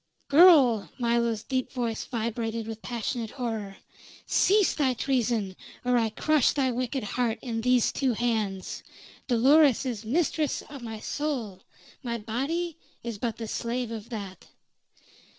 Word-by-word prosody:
"Girl!" 285 Hz, -, +6 dB
Milo's 235 Hz, -3 st, +1 dB
deep 260 Hz, -1 st, -2 dB
voice 235 Hz, -4 st, -2 dB
vibrated 230 Hz, -1 st, -3 dB
with 225 Hz, 0 st, -7 dB
passionate 235 Hz, -1 st, -3 dB
horror. 220 Hz, -6 st, -4 dB, 0.5 s
"Cease 405 Hz, 0 st, +3 dB
thy 265 Hz, -4 st, +1 dB
treason, 230 Hz, -6 st, 0 dB, 0.3 s
or 250 Hz, 0 st, +3 dB
I 230 Hz, -2 st, +2 dB
crush 300 Hz, +5 st, +2 dB
thy 265 Hz, -3 st, +1 dB
wicked 255 Hz, +1 st, -2 dB
heart 230 Hz, +2 st, -1 dB
in 230 Hz, -3 st, -3 dB
these 250 Hz, 0 st, +3 dB
two 265 Hz, -3 st, 0 dB
hands. 215 Hz, -5 st, -2 dB, 0.5 s
Dolores 270 Hz, +2 st, +5 dB
is 235 Hz, -4 st, -3 dB
mistress 305 Hz, +4 st, 0 dB
of 280 Hz, -2 st, -10 dB
my 225 Hz, -2 st, -6 dB
soul 235 Hz, -10 st, -3 dB, 0.4 s
my 235 Hz, -3 st, -3 dB
body 290 Hz, +10 st, -3 dB, 0.2 s
is 230 Hz, -3 st, -5 dB
but 230 Hz, -1 st, -2 dB
the 225 Hz, -, -5 dB
slave 235 Hz, +2 st, -3 dB
of 225 Hz, 0 st, -7 dB
that." 200 Hz, -5 st, -7 dB
235 Hz, 135 wpm, -27 LUFS, 225-265 Hz, 0.5 s, Girl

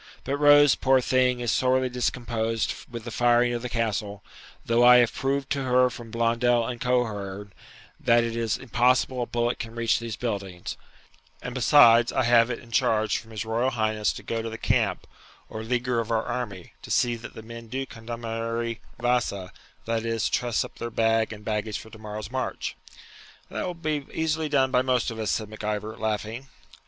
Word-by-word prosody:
But 140 Hz, +2 st, -2 dB
Rose, 145 Hz, -1 st, +7 dB
poor 130 Hz, 0 st, +3 dB
thing, 125 Hz, -1 st, +2 dB
is 120 Hz, -2 st, 0 dB
sorely 130 Hz, 0 st, +2 dB
discomposed 115 Hz, -3 st, -1 dB, 0.2 s
with 120 Hz, -2 st, -7 dB
the 120 Hz, -, -7 dB
firing 120 Hz, +2 st, +3 dB
of 120 Hz, -, -3 dB
the 125 Hz, -, -4 dB
Castle, 105 Hz, -3 st, -2 dB, 0.4 s
though 115 Hz, +1 st, +3 dB
I 125 Hz, 0 st, +9 dB
have 120 Hz, -2 st, +3 dB
proved 135 Hz, +1 st, -2 dB
to 140 Hz, -, 0 dB
her 125 Hz, 0 st, +3 dB
from 120 Hz, -2 st, -9 dB
Blondel 115 Hz, +1 st, +2 dB
and 120 Hz, 0 st, -5 dB
Coehorn, 105 Hz, -5 st, -2 dB, 0.5 s
that 120 Hz, 0 st, +4 dB
it 115 Hz, -1 st, -3 dB
is 115 Hz, -1 st, 0 dB
impossible 125 Hz, 0 st, +1 dB
a 120 Hz, -, -2 dB
bullet 120 Hz, 0 st, -1 dB
can 115 Hz, 0 st, -6 dB
reach 115 Hz, -1 st, +1 dB
these 115 Hz, -2 st, -5 dB
buildings; 100 Hz, -5 st, -4 dB, 0.7 s
and, 125 Hz, -, -5 dB
besides, 120 Hz, -2 st, +6 dB
I -, -, +1 dB
have 115 Hz, 0 st, +5 dB
it 120 Hz, -, -2 dB
in 115 Hz, -, -15 dB
charge 110 Hz, -1 st, +2 dB
from 115 Hz, -, -15 dB
his 110 Hz, -2 st, -5 dB
Royal 115 Hz, +3 st, +1 dB
Highness 110 Hz, -3 st, 0 dB
to -, -, -9 dB
go 115 Hz, 0 st, -2 dB
to 115 Hz, -, -4 dB
the 115 Hz, -, -6 dB
camp, -, -, 0 dB, 0.4 s
or 110 Hz, -, -6 dB
leaguer 120 Hz, +1 st, 0 dB
of 115 Hz, -, -3 dB
our 115 Hz, -1 st, 0 dB
army, 110 Hz, -7 st, -5 dB
to -, -, -11 dB
see 120 Hz, -1 st, +2 dB
that 115 Hz, -, -10 dB
the 110 Hz, -, -9 dB
men 115 Hz, +1 st, -10 dB
do 135 Hz, +4 st, -3 dB
condamare 115 Hz, 0 st, -4 dB, 0.2 s
vasa, 120 Hz, -6 st, -1 dB, 0.3 s
that 115 Hz, 0 st, -1 dB
is, 115 Hz, -1 st, 0 dB
truss 120 Hz, -3 st, 0 dB
up -, -, -13 dB
their 120 Hz, -, -3 dB
bag 115 Hz, -1 st, +1 dB
and 105 Hz, -1 st, -10 dB
baggage 105 Hz, 0 st, -2 dB
for 110 Hz, -, -11 dB
tomorrow's 110 Hz, 0 st, -7 dB
march.' 130 Hz, 0 st, -3 dB, 0.8 s
'That -, -, -3 dB
will 180 Hz, -, -4 dB
be 155 Hz, -3 st, -3 dB
easily 160 Hz, -1 st, -1 dB
done 135 Hz, -2 st, +2 dB
by 125 Hz, -, +4 dB
most 125 Hz, -2 st, +1 dB
of 110 Hz, -, -7 dB
us,' 110 Hz, -2 st, -2 dB
said 110 Hz, +1 st, -1 dB
Mac 110 Hz, +1 st, -10 dB
Ivor, 105 Hz, +1 st, -3 dB
laughing. 110 Hz, +4 st, -3 dB
115 Hz, 190 wpm, -26 LUFS, 110-125 Hz, 0.8 s, I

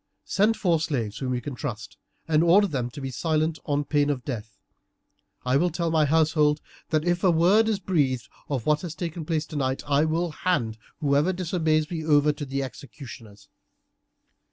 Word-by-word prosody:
Send 215 Hz, +3 st, +2 dB
four 170 Hz, -5 st, +2 dB
slaves 120 Hz, -10 st, -2 dB
whom 130 Hz, -2 st, -1 dB
you 125 Hz, -, -3 dB
can 140 Hz, +3 st, -5 dB
trust, 110 Hz, -2 st, -6 dB, 0.3 s
and 160 Hz, 0 st, +3 dB
order 185 Hz, +5 st, +6 dB
them 130 Hz, -9 st, -2 dB
to 120 Hz, -, -9 dB
be 135 Hz, -1 st, -4 dB
silent 155 Hz, +2 st, 0 dB
on 145 Hz, 0 st, +1 dB
pain 145 Hz, 0 st, +1 dB
of 135 Hz, -4 st, -2 dB
death. 110 Hz, -6 st, -6 dB, 0.9 s
I 125 Hz, +2 st, +3 dB
will 175 Hz, +5 st, +2 dB
tell 170 Hz, 0 st, -2 dB
my 155 Hz, -2 st, +3 dB
household 150 Hz, -1 st, +3 dB, 0.3 s
that 155 Hz, 0 st, +1 dB
if 175 Hz, 0 st, 0 dB
a 190 Hz, -, +5 dB
word 185 Hz, +7 st, +4 dB
is 215 Hz, -, +1 dB
breathed 145 Hz, -10 st, 0 dB, 0.2 s
of 135 Hz, -6 st, -2 dB
what 150 Hz, 0 st, +2 dB
has 170 Hz, -3 st, -6 dB
taken 165 Hz, -1 st, -5 dB
place 155 Hz, -1 st, -1 dB
tonight, 135 Hz, -5 st, -2 dB
I 145 Hz, +2 st, +3 dB
will 165 Hz, +2 st, 0 dB
hand 120 Hz, -10 st, -1 dB, 0.2 s
whoever 145 Hz, +4 st, +2 dB
disobeys 165 Hz, -4 st, 0 dB
me 165 Hz, -2 st, -3 dB
over 150 Hz, -1 st, +4 dB
to 145 Hz, 0 st, -6 dB
the 135 Hz, +1 st, -2 dB
executioners. 120 Hz, -5 st, -10 dB
150 Hz, 180 wpm, -25 LUFS, 135-170 Hz, 0.9 s, order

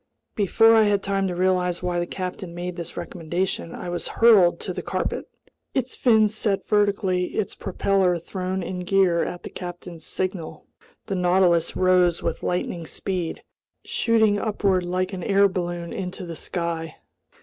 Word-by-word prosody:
Before 225 Hz, +3 st, +4 dB
I 220 Hz, -1 st, +6 dB
had 205 Hz, -1 st, +2 dB
time 195 Hz, -1 st, 0 dB
to 180 Hz, -, -3 dB
realize 180 Hz, -1 st, +1 dB
why 175 Hz, -1 st, 0 dB
the 175 Hz, -, -2 dB
captain 180 Hz, -1 st, -5 dB
made 175 Hz, 0 st, -4 dB
this 170 Hz, -2 st, -7 dB
recommendation, 170 Hz, 0 st, -3 dB
I 180 Hz, -, -6 dB
was 175 Hz, -, -4 dB
hurled 210 Hz, -7 st, +5 dB
to -, -, -4 dB
the -, -, -4 dB
carpet. -, -, -2 dB, 0.5 s
Its 260 Hz, -1 st, -1 dB
fins 220 Hz, -3 st, +4 dB
set 210 Hz, -2 st, -1 dB
vertically, 200 Hz, -3 st, +2 dB
its 210 Hz, -, -1 dB
propeller 190 Hz, -3 st, +1 dB
thrown 185 Hz, +2 st, -4 dB
in 180 Hz, +1 st, -4 dB
gear 180 Hz, -2 st, +2 dB
at 175 Hz, -, -5 dB
the -, -, -7 dB
captain's 175 Hz, -2 st, -8 dB
signal, 185 Hz, -3 st, -4 dB, 0.4 s
the 195 Hz, -, -3 dB
Nautilus 180 Hz, -2 st, +3 dB
rose 180 Hz, -2 st, +3 dB
with -, -, -2 dB
lightning 175 Hz, -2 st, -2 dB
speed, 180 Hz, -2 st, -3 dB, 0.4 s
shooting 220 Hz, -3 st, +2 dB
upward 200 Hz, -3 st, +1 dB
like 185 Hz, +2 st, -2 dB
an 185 Hz, -, -4 dB
air 200 Hz, +1 st, +4 dB
balloon 175 Hz, -2 st, -4 dB
into 185 Hz, 0 st, -5 dB
the 170 Hz, -1 st, -6 dB
sky. 165 Hz, -2 st, -4 dB
185 Hz, 160 wpm, -24 LUFS, 175-195 Hz, 0.5 s, I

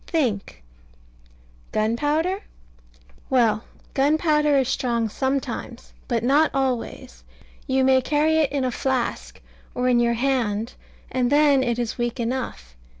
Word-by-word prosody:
Think... 230 Hz, -, -2 dB, 1.1 s
Gunpowder? 295 Hz, -, 0 dB, 0.9 s
Well, 230 Hz, -4 st, +2 dB, 0.3 s
gunpowder 300 Hz, +1 st, +3 dB
is 265 Hz, -2 st, +2 dB
strong 235 Hz, -4 st, 0 dB
sometimes: 265 Hz, -1 st, -3 dB
but 235 Hz, -3 st, -1 dB
not 285 Hz, +5 st, +4 dB
always. 260 Hz, -3 st, -3 dB, 0.4 s
You 265 Hz, -1 st, +2 dB
may 260 Hz, 0 st, +4 dB
carry 305 Hz, +4 st, +2 dB
it 305 Hz, -4 st, +2 dB
in 280 Hz, -2 st, -1 dB
a 255 Hz, -, 0 dB
flask, 260 Hz, 0 st, -2 dB, 0.4 s
or 250 Hz, 0 st, 0 dB
in 245 Hz, -1 st, +4 dB
your 235 Hz, 0 st, +2 dB
hand, 235 Hz, -3 st, -1 dB, 0.4 s
and 250 Hz, -1 st, 0 dB
then 290 Hz, -2 st, +5 dB
it 240 Hz, -2 st, 0 dB
is 240 Hz, 0 st, -3 dB
weak 240 Hz, +1 st, -2 dB
enough. 230 Hz, -, -4 dB
260 Hz, 125 wpm, -23 LUFS, 235-280 Hz, 1.1 s, then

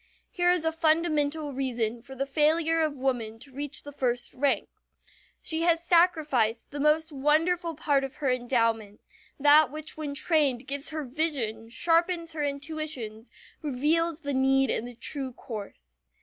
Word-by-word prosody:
Here 355 Hz, -1 st, +2 dB
is 355 Hz, -2 st, +2 dB
a 320 Hz, -, +2 dB
fundamental 315 Hz, -2 st, +1 dB
reason 240 Hz, -3 st, -2 dB
for 265 Hz, +3 st, -11 dB
the 270 Hz, +1 st, -2 dB
failure 320 Hz, +3 st, +2 dB
of 305 Hz, -2 st, 0 dB
woman 245 Hz, -4 st, -2 dB
to 270 Hz, +4 st, -15 dB
reach 285 Hz, +1 st, -4 dB
the 290 Hz, -, -9 dB
first 245 Hz, -3 st, -2 dB
rank. 280 Hz, +1 st, 0 dB, 0.8 s
She 320 Hz, -1 st, -1 dB
has 335 Hz, 0 st, +2 dB
sacrificed 305 Hz, -11 st, +2 dB
the 290 Hz, -, -6 dB
most 310 Hz, +2 st, +2 dB
wonderful 320 Hz, +4 st, +1 dB
part 285 Hz, -2 st, +1 dB
of 270 Hz, +1 st, -5 dB
her 280 Hz, -4 st, 0 dB
endowment, 230 Hz, -4 st, 0 dB, 0.4 s
that 295 Hz, 0 st, +6 dB
which 310 Hz, +1 st, -4 dB
when 295 Hz, -2 st, -4 dB
trained 280 Hz, -6 st, +2 dB
gives 280 Hz, +1 st, 0 dB
her 310 Hz, -1 st, -4 dB
vision, 255 Hz, -6 st, -2 dB
sharpens 335 Hz, +4 st, +1 dB
her 305 Hz, -2 st, -2 dB
intuitions, 280 Hz, -6 st, -4 dB, 0.3 s
reveals 310 Hz, +4 st, 0 dB
the 285 Hz, -2 st, -3 dB
need 270 Hz, 0 st, +3 dB
and 235 Hz, -, -2 dB
the 245 Hz, -, -10 dB
true 260 Hz, +2 st, -4 dB
course. 200 Hz, -, -9 dB
285 Hz, 155 wpm, -27 LUFS, 255-315 Hz, 0.8 s, that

